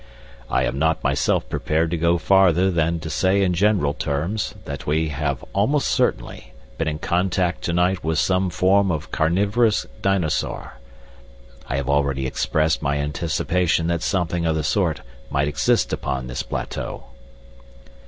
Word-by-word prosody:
"I - - +1
am 70 - -2
not 80 +1 +1
myself - - +1
prepared 80 +1 -1
to - - +1
go 85 +1 +2
farther 95 0 +4
than 85 -1 0
to 80 - -6
say 95 +1 +2
in 90 -2 +1
general 90 -5 +2
terms 80 +10 -2
that - - -6
we 80 +2 +1
have 75 -2 -3
almost 135 +9 +1
certainly - - -1 0.3
been 80 - 0
in 75 -1 -1
contact 90 +2 0
to 85 - -1
night 90 +2 +1
with 80 0 0
some 95 +2 +2
form 95 +3 +3
of 75 -2 -4
carnivorous 100 +7 +2 0.2
dinosaur. 90 - -1 0.9
I 65 - -1
have 70 -1 -2
already 70 -1 +1
expressed 80 +4 0
my 70 -1 0
anticipation 80 +4 0
that 85 -1 0
something 90 -3 -1
of 80 -1 +1
the 80 - -1
sort 80 -1 0 0.3
might 70 0 0
exist 75 - +1
upon 65 -1 -3
this 60 +2 -4
plateau." - - -5
80 Hz, 155 wpm, -22 LUFS, 75-95 Hz, 0.9 s, farther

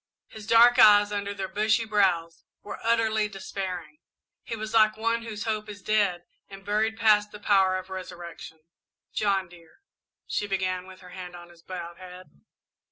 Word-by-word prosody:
His 215 -1 -11
dark 240 +2 +6
eyes, 205 -2 +7
under 200 -1 -3
their 195 -1 -4
bushy 215 +3 +1
brows, 185 -6 +1 0.2
were 205 - -8
utterly 220 -2 +2
despairing; 195 - -6 0.4
he 230 - -6
was 220 0 -6
like 215 -1 +4
one 230 +1 0
whose 220 -2 -6
hope 215 -1 -3
is 205 -1 -10
dead 200 -5 +1 0.3
and 195 0 -12
buried 220 +2 0
past 210 -1 +3
the 210 - -10
power 190 -2 +3
of 185 0 -8
resurrection. 175 -3 -9 0.5
"John, 195 -3 0
dear 170 - -19 0.2
" - - -65
she 205 - -2
began, 185 -1 -2
with 190 0 -13
her 180 - -13
hand 180 -1 -9
on 175 0 -12
his 170 -1 -19
bowed 170 -1 -8
head. 185 0 -12
200 Hz, 170 wpm, -26 LUFS, 185-215 Hz, 0.5 s, eyes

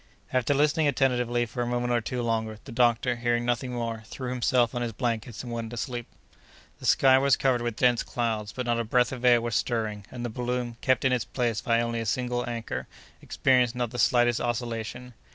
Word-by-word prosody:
After 130 +3 +2
listening 150 +2 +3
attentively 125 -3 +1
for 120 +2 -5
a 120 - -1
moment 120 0 0
or 120 - +2
two 125 +2 -3
longer, 110 -2 -1
the 135 - -9
doctor, 120 0 +2
hearing 120 0 0
nothing 120 +1 -1
more, 115 -2 -3
threw 130 +1 -5
himself 125 -1 +2
on 120 - -2
his 120 -2 -2
blankets 115 -1 -3
and 120 - -7
went 115 -1 -4
asleep. 120 0 -4 0.7
The - - -4
sky 130 -1 +6
was 140 0 +4
covered 130 -3 +2
with 120 -2 -2
dense 120 -1 +3
clouds, 110 -3 -2
but 125 +1 -4
not 120 -1 +1
a - - 0
breath 125 +2 +2
of 130 -2 -6
air 120 -1 +6
was 120 -1 -3
stirring; 110 -4 -1
and 120 -1 -6
the - - -2
balloon, 120 0 -3
kept 130 +1 +2
in 130 - +4
its 125 - 0
place 120 -4 -1
by 115 0 +2
only 115 0 -2
a 115 - -3
single 125 +1 -1
anchor, 115 -1 -4 0.3
experienced 125 -2 +2
not 120 -2 -2
the 120 - -5
slightest 120 0 +3
oscillation. 120 +1 -3
120 Hz, 210 wpm, -27 LUFS, 115-125 Hz, 0.7 s, sky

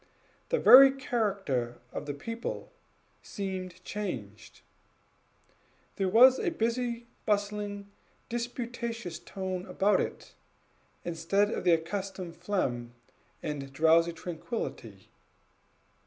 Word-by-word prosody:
The - - +2
very 270 - +10
character 200 - -1 0.2
of 145 - -5
the 145 - -3
people 230 +10 -5 0.5
seemed 185 -2 -6
changed. 115 - -6 1.4
There 195 -1 +1
was 250 +6 +7
a - - +1
busy, 235 -4 -1 0.2
bustling, 205 -1 -1 0.4
disputatious 235 -5 -4
tone 185 +1 -5
about 195 +3 +2
it, - - -6 0.7
instead 175 +5 +1
of - - -3
the 175 - +6
accustomed 185 +1 -3
phlegm 120 -12 -2 0.5
and 140 -2 -4
drowsy 165 +4 +4
tranquillity. 165 - -6
195 Hz, 95 wpm, -29 LUFS, 165-230 Hz, 1.4 s, very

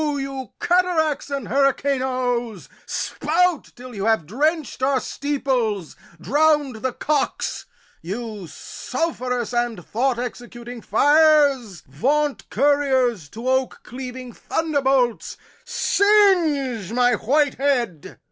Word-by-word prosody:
You 275 -3 -3
cataracts 345 -5 +1
and 275 -6 -4
hurricanoes, 255 -4 0 0.2
spout 345 +1 0
Till 250 0 -11
you 200 -2 -4
have 220 -7 +2
drench'd 295 - -1
our 265 0 +2
steeples, 255 - -2 0.2
drown'd 295 -3 +2
the 255 +3 -2
cocks! 290 +2 -2 0.3
You 210 +1 -6
sulph'rous 250 - -4
and 240 -7 -1
thought 250 +2 0
executing 240 0 -7
fires, 285 - +3
Vaunt 280 - -1
couriers 260 - +1
to 230 - -7
oak 260 -1 0
cleaving 250 0 -8
thunderbolts, 270 -7 0 0.3
Singe 330 - +2
my 245 +1 +3
white 280 +6 +1
head! 245 - -1
260 Hz, 100 wpm, -22 LUFS, 235-290 Hz, 0.3 s, fires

